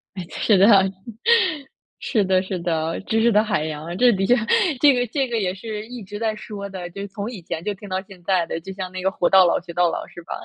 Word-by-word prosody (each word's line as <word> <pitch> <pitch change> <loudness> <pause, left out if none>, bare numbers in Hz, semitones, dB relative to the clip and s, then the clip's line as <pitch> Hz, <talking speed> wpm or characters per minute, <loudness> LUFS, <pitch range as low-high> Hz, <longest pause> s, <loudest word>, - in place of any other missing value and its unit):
诶， 185 -3 -6
是 210 - +2
的。 195 +2 +6 1.3
是 220 -6 +1
的 185 0 +2
是 190 -1 -4
的， 165 -1 -2
知 225 0 +1
识 235 - +4
的 210 0 +4
海 210 -8 -1
洋， 160 +3 -5
这 245 +2 +5
的 195 -1 0
确 245 - +5 0.4
这 285 0 +6
个 245 -1 0
这 270 +3 -1
个 235 -2 -1
也 185 -3 -1
是 215 +1 -6
一 245 -2 -8
直 205 +2 -8
在 220 -1 -1
说 205 -1 -7
的。 185 -2 -7
就 200 - -7
是 200 - -5
从 200 +3 -6
以 210 -7 -8
前 165 -1 -5
就 210 - -2
听 200 +1 -12
到 185 0 -1
现 190 -2 -15
在 180 -1 +1
的， 165 - -4
就 190 - -8
像 185 -1 -6
那 185 0 -6
个 190 - +3
活 175 - 0
到 190 -1 +7
老 170 - +2
学 170 0 -10
到 175 0 +3
老 - - -4
是 175 - -12
吧， - - -6
195 Hz, 280 characters per minute, -22 LUFS, 180-215 Hz, 1.3 s, 到